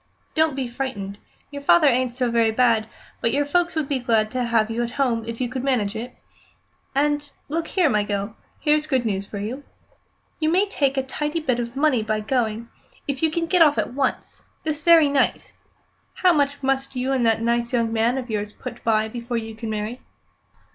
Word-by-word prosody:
"Don't 315 -2 +2
be 265 -2 -2
frightened. 235 -6 -5 0.3
Your 285 0 -6
father 305 +3 +5
ain't 255 -2 +2
so 250 -2 0
very 230 -1 +3
bad, 225 -1 +2 0.3
but 230 - +1
your 285 +3 +1
folks 345 +4 +1
would 310 -3 -1
be 275 -2 0
glad 225 -3 +1
to 255 -1 -1
have 225 -2 +1
you 230 +1 -1
at 240 - -1
home 240 -5 +1
if 230 0 -5
you 250 - 0
could 255 +1 -4
manage 230 -6 0
it. 240 +3 -6 0.8
And, 290 +1 +1 0.2
look 330 +2 -2
here, 365 -4 +2
my 210 -6 +2
gell, 205 +1 -3 0.2
here's 300 0 +2
good 260 -5 +1
news 200 -2 -2
for 205 - -7
you. 230 +8 -5 0.8
You 310 -1 +1
may 375 +5 +3
make 275 -1 +3
a 265 - +2
tidy 295 +4 -2
bit 255 -6 0
of 235 +1 -4
money 280 -4 +2
by 215 0 -1
going, 230 0 -1 0.4
if 275 -2 -3
you 320 - +3
can 330 +2 -1
get 355 +1 +2
off 300 -3 +6
at - - -1
once 270 0 -2 0.2
this 310 -1 -2
very 330 -1 +6
night. 280 -2 0 0.6
How 365 -2 +4
much 285 -2 0
must 270 0 0
you 255 +1 -1
and 260 -2 +1
that 225 0 +2
nice 235 0 0
young 230 -2 0
man 230 +3 +2
of 255 -2 -4
yours 210 -2 -3
put 240 - -9
by 220 -1 +2
before 235 +1 -4
you 225 -1 -5
can 225 0 -6
marry?" 215 +3 -4
250 Hz, 210 wpm, -23 LUFS, 225-285 Hz, 0.8 s, off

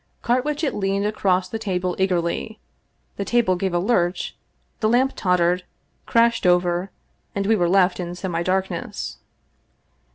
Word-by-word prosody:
Carwitchet 285 +5 0
leaned 195 0 0
across 190 -3 +1
the 225 +4 -5
table 185 -4 -2
eagerly, 190 +3 -1 0.6
the 200 - -1
table 225 -4 +2
gave 190 +1 -1
a 175 - +1
lurch, 180 -2 0 0.4
the 215 - +2
lamp 255 +3 +3
tottered, 180 -1 +2 0.4
crashed 230 -4 +3
over, 180 +1 +2 0.5
and 200 0 -1
we 220 +2 +4
were 175 -4 +1
left 185 0 +3
in 175 -1 -4
semidarkness. 185 +1 -2
190 Hz, 130 wpm, -22 LUFS, 180-220 Hz, 0.6 s, we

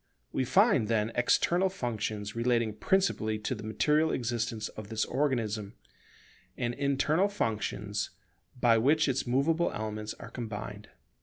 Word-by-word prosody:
We 130 - 0
find, 185 - +4
then, 110 0 +1
external 175 +10 +3
functions 110 - -3
relating 115 -2 +1
principally 110 - +1
to 105 +4 -3
the 110 - -7
material 150 +8 +2
existence 115 -2 -2
of 105 -1 -9
this 110 -1 0
organism; 115 -7 -1 0.8
and 120 -1 -1
internal 145 +7 +2
functions 105 - -2 0.5
by 115 -2 +5
which 150 +6 +3
its 135 -1 0
movable 155 +7 +2
elements 110 0 -4
are 115 - -10
combined. 105 -3 -6
115 Hz, 130 wpm, -30 LUFS, 110-140 Hz, 0.8 s, by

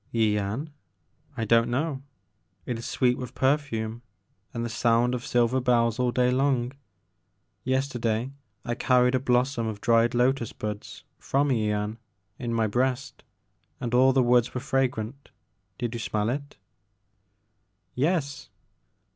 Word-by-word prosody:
Yian? 110 +5 0 0.7
I 115 - -1
don't 115 +1 +4
know. 135 +2 -1 0.6
It 120 -2 -3
is 115 - -6
sweet 125 -1 +1
with 125 -1 -7
per 135 +2 +4
fume 115 -5 -5 0.5
and 115 0 -3
the - - -1
sound 115 +2 +2
of 125 -1 -3
silver 125 +2 +2
bells 115 -2 +2
all 125 -1 +2
day 125 0 +2
long. 130 -2 +1 0.9
Yesterday 130 -2 -1 0.3
I 120 - -1
carried 125 +1 +3
a 130 - +3
blossom 125 -1 +1
of 110 -2 -4
dried 115 +2 +3
lotus 125 -1 +1
buds 105 -1 -6 0.2
from 140 +1 +1
Yian, 105 -3 0 0.4
in 120 -2 -3
my 115 -1 +1
breast, 125 +4 -1 0.6
and 120 -1 -4
all 130 +2 +6
the 130 -1 +3
woods 120 0 +3
were - - 0
fragrant. 130 -1 -2 0.5
Did 120 -1 -3
you 120 - -4
smell 105 -1 -1
it? 140 +2 -6 0.6
" 100 -2 -47
'*Yes." 145 0 -1
120 Hz, 140 wpm, -26 LUFS, 115-130 Hz, 0.9 s, all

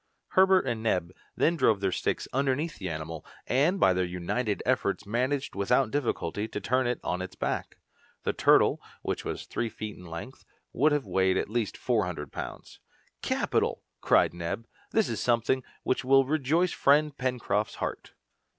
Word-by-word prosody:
Herbert 190 -2 +5
and 120 -4 -2
Neb 90 -6 0 0.2
then 170 - +2
drove 115 -9 +3
their 95 -1 0
sticks - - -1
underneath 140 +4 0
the 95 -2 -3
animal, 80 0 -5 0.2
and 155 +10 +2
by 95 - +5
their 90 0 +1
united 90 +5 -2
efforts 115 -5 0
managed 130 +6 -1
without 105 +5 +2
difficulty 110 - -1
to - - -5
turn 130 +1 +1
it 125 - -1
on 90 +1 -2
its 95 - -6
back. - - -3 0.5
The - - 0
turtle, - - +4 0.2
which - - -2
was - - -4
three 115 - -2
feet 110 -1 -6
in 90 - -12
length, 85 +11 -8 0.3
would 150 +6 +3
have 145 -2 +1
weighed 95 0 +2
at - - -2
least 115 -3 -1
four 115 -7 +1
hundred 75 -6 -6
pounds. - - -7 0.4
"Capital!" - - 0 0.2
cried - - +4
Neb; 85 +6 -4 0.2
"this 220 -2 +2
is 115 - -3
something 120 +2 +2 0.2
which 130 - 0
will 135 +1 +5
rejoice 155 +5 +1
friend 150 +1 +3
Pencroft's 120 -6 -1
heart." - - -5
120 Hz, 170 wpm, -28 LUFS, 95-135 Hz, 0.5 s, Herbert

